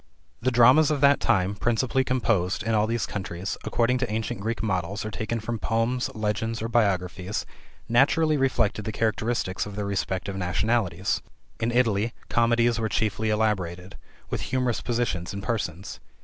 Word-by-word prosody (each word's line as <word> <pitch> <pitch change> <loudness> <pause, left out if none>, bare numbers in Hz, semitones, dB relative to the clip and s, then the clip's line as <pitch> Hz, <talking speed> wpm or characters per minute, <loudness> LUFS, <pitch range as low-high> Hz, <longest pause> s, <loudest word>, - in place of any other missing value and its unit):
The 130 - +2
dramas 130 +5 +6
of 150 -2 0
that 140 0 +5
time, 95 0 +2
principally 120 +5 +1
composed, 115 -8 0
in 115 +1 0
all 105 0 +3
these 115 0 -1
countries, 95 -1 -4
according 125 +2 +1
to 125 -4 -2
ancient 110 -2 -2
Greek 110 +2 -3
models, 95 0 -2
or 110 - -4
taken 110 +3 -3
from 115 +1 -4
poems, 115 +4 0
legends, 110 +1 -1
or 115 - -2
biographies, 95 -4 0 0.4
naturally 150 +6 +3
reflected 120 -6 +1
the 110 - -2
characteristics 110 -3 -1
of 100 - -8
their 105 0 -3
respective 100 0 -2
nationalities: 95 +4 0 0.4
in 115 +1 0
Italy 115 -2 +1
comedies 115 0 +2
were 110 -1 -1
chiefly 110 0 0
elaborated, 95 -4 -1 0.4
with - - -2
humorous 125 -2 -1
positions 110 -7 -2
and 100 0 -5
persons. 100 -6 -3
110 Hz, 155 wpm, -26 LUFS, 100-120 Hz, 0.4 s, dramas